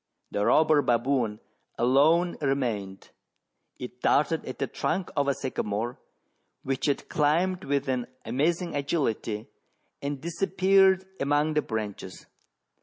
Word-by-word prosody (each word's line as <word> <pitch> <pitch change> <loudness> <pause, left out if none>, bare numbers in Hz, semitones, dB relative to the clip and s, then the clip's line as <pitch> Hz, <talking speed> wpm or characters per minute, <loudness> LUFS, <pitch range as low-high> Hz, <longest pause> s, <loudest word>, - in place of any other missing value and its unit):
The 100 - 0
robber 155 -1 +5
baboon 120 -3 +1 0.4
alone 155 +8 +3
remained: 115 -9 -2 0.7
it 125 0 -9
darted 155 +2 +2
at 130 - -6
the 135 - -1
trunk 185 +7 -2
of 140 -2 +1
a 140 - +2
sycamore, 120 -3 -3 0.6
which 135 +1 -1
it 140 - -1
climbed 175 +5 +1
with 140 0 0
an 125 -2 -1 0.2
amazing 165 +9 0
agility, 115 -7 -1 0.6
and 140 0 -3
disappeared 190 +3 +3
among 145 +2 +1
the 150 - +2
branches. 105 -6 -5
140 Hz, 115 wpm, -27 LUFS, 120-160 Hz, 0.7 s, robber